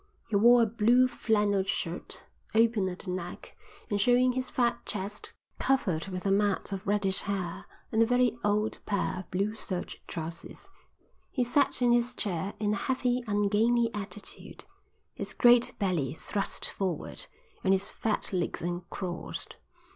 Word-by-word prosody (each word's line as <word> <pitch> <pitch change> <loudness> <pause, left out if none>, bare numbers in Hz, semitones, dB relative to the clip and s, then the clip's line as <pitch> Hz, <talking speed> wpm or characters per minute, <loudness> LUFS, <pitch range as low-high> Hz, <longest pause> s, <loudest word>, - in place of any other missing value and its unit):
He 215 - -1
wore 235 +3 +7
a - - +4
blue 235 +3 +4
flannel 210 -5 +1
shirt, 175 -2 -3 0.3
open 225 -4 +3
at 180 - -6
the 180 - -3
neck 185 +1 -6 0.3
and 205 -3 0
showing 250 +3 +4
his 255 +1 -2
fat 240 -1 +1
chest 205 0 -5 0.3
covered 195 -11 +1
with 185 -1 -5
a 195 - +2
mat 200 0 +1
of 195 +1 -5
reddish 200 -1 +2
hair, 190 -4 -3 0.3
and 220 - +3
a - - +6
very 245 -1 +3
old 210 +1 +1
pair 200 -2 0
of 185 - -9
blue 200 +4 0
serge 185 -4 -5
trousers. 165 - -6 0.6
He 255 - 0
sat 255 +1 +2
in 240 - +5
his 240 +1 +2
chair 190 -1 -2
in 210 -1 +1
a - - 0
heavy 250 +1 0
ungainly 215 +3 +2
attitude, 210 0 -6 0.5
his - - -5
great 240 0 +5
belly 170 - 0
thrust 200 +4 -1
forward 185 -6 -3 0.4
and 190 - +3
his 195 +1 +3
fat 215 -2 -1
legs 175 -3 -1
uncrossed. 175 +1 -5
205 Hz, 155 wpm, -29 LUFS, 190-235 Hz, 0.6 s, wore